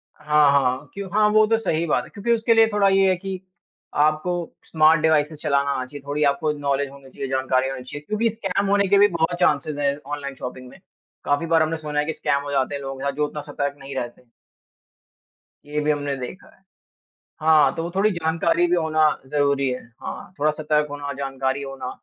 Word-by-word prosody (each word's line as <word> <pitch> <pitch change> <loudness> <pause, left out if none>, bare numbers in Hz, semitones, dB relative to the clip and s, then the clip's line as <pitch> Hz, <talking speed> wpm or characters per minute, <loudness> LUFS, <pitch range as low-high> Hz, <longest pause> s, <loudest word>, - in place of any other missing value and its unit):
हाँ, 150 -1 +3
हाँ। 135 0 +1
क्यों 200 -1 -6
हाँ, 210 0 +4
वो 215 +1 +5
तो 225 +1 +3
सही 170 -7 -1
बात 150 - +1
है। - - -13
क्योंकि 215 +3 -3
उसके 230 0 +3
लिए 225 0 +6
थोड़ा 205 -1 +3
ये 195 0 +4
है 185 - +3
कि 190 +1 -5 0.6
आपको 155 +3 +1 0.3
स्मार्ट 155 0 +4
डिवाइसेज़ 155 -1 +2
चलाना 140 -2 +1
आना 130 -2 -2
चाहिए। 145 +2 -10
थोड़ी 145 +1 0
आपको 150 +2 -1
नॉलेज 140 -1 -1
होनी 140 -1 -14
चाहिए, 135 +1 -6
जानकारी 130 0 +1
होनी 130 -1 -6
चाहिए। 145 +3 -8
क्योंकि 215 +2 +1
स्कैम 200 -3 -2
होने 200 0 +3
के 200 +1 +4
भी 205 +1 +7
बहुत 170 -2 -1
चांसेज़ 150 -3 +1
हैं 140 -1 +1 0.2
ऑनलाइन 140 -1 -6
शॉपिंग 125 0 -8
में। - - -16 0.5
काफ़ी 145 +3 +1
बार 165 -1 +3
हमने 160 +1 -1
सुना 150 -1 -3
है 150 - +1
कि 160 - -2
स्कैम 140 -1 0
हो 145 - -5
जाते 140 0 0
हैं 140 - -5
लोग, 135 -1 -6
या 140 - 0
जो 150 +2 -1
उतना 150 0 -6
सतर्क 140 0 -2
नहीं 135 0 -8
रहते। 120 -1 -6 1.4
ये 150 +1 -3
भी 150 0 +1
हमने 145 -1 -2
देखा 130 +9 -9
है। - - -31 0.8
हाँ, 155 -3 +5
तो 165 - -3
वो 170 - -3
थोड़ी 205 +3 +3
जानकारी 165 0 +1
भी 175 - +2
होना 155 -2 +3 0.2
ज़रूरी 140 -1 +1
है। 125 0 -3 0.2
हाँ, - - -7
थोड़ा 155 +1 +3
सतर्क 150 0 0
होना, 145 0 -5
जानकारी 135 0 -2
होना। 135 -2 -6
150 Hz, 215 wpm, -23 LUFS, 140-170 Hz, 1.4 s, भी